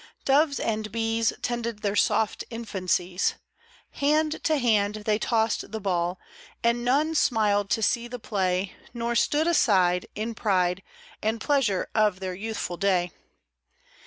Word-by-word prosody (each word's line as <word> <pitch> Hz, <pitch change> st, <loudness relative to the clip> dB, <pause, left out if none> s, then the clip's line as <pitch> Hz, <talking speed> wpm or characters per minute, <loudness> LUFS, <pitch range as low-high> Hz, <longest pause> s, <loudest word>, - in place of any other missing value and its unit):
Doves 280 Hz, +1 st, +3 dB
and 215 Hz, -1 st, -2 dB
bees 225 Hz, 0 st, +1 dB
Tended 235 Hz, -3 st, -3 dB
their 200 Hz, 0 st, 0 dB
soft 215 Hz, +1 st, +1 dB
infancies: 185 Hz, -5 st, -1 dB, 0.6 s
Hand 305 Hz, +2 st, +1 dB
to 310 Hz, -1 st, +3 dB
hand 215 Hz, -4 st, +1 dB
they 215 Hz, -1 st, +2 dB
tossed 225 Hz, -2 st, 0 dB
the 220 Hz, -, -4 dB
ball, 180 Hz, -2 st, -1 dB, 0.4 s
And 235 Hz, +1 st, +2 dB
none 290 Hz, +6 st, +2 dB
smiled 210 Hz, -8 st, +2 dB
to 225 Hz, -, 0 dB
see 235 Hz, +3 st, +1 dB
the 245 Hz, +1 st, -6 dB
play, 190 Hz, -4 st, -1 dB, 0.2 s
Nor 235 Hz, 0 st, -1 dB
stood 295 Hz, +6 st, +2 dB
aside 190 Hz, -, +3 dB
In 220 Hz, +2 st, -3 dB
pride 185 Hz, -4 st, +1 dB, 0.4 s
And 220 Hz, +1 st, -1 dB
pleasure 250 Hz, -8 st, +1 dB
of 210 Hz, -4 st, +2 dB
their 185 Hz, -1 st, -4 dB
youthful 200 Hz, -2 st, -4 dB
day. 180 Hz, -3 st, +1 dB
220 Hz, 135 wpm, -26 LUFS, 195-240 Hz, 0.6 s, Doves